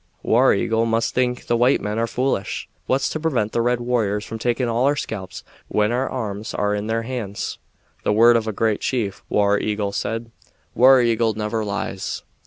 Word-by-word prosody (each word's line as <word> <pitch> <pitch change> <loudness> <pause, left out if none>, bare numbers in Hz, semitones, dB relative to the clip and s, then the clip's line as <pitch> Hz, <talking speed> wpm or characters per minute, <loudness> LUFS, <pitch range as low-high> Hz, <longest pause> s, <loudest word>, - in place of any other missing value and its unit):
"War - - +4
Eagle 115 +1 +1
must 115 0 0
think 125 -1 0
the 120 - +1
white 125 +3 +3
men 105 +2 -3
are 115 - +1
foolish. 125 -5 -2 0.2
What's 135 +1 +1
to 155 - -3
prevent 130 -10 0
the 120 - 0
red 120 +1 +1
warriors 110 -4 0
from 115 - -6
taking 120 +2 0
all 120 +2 +1
our 145 +1 +3
scalps 95 -9 -6 0.2
when 105 +1 +1
our 125 +2 0
arms 110 -4 -4
are 105 0 0
in 105 +1 -2
their 115 +1 -1
hands?" 115 -5 -4 0.4
"The - - +1
word 115 +3 +6
of 115 -1 +1
a - - 0
great 110 0 0
chief," 110 -7 -2
War 100 0 +2
Eagle 105 -1 -1
said. 115 +2 -3 0.4
"War 130 +1 +7
Eagle 115 -2 +1
never 110 +1 -2
lies." 100 -2 -4
115 Hz, 195 wpm, -22 LUFS, 105-120 Hz, 0.4 s, War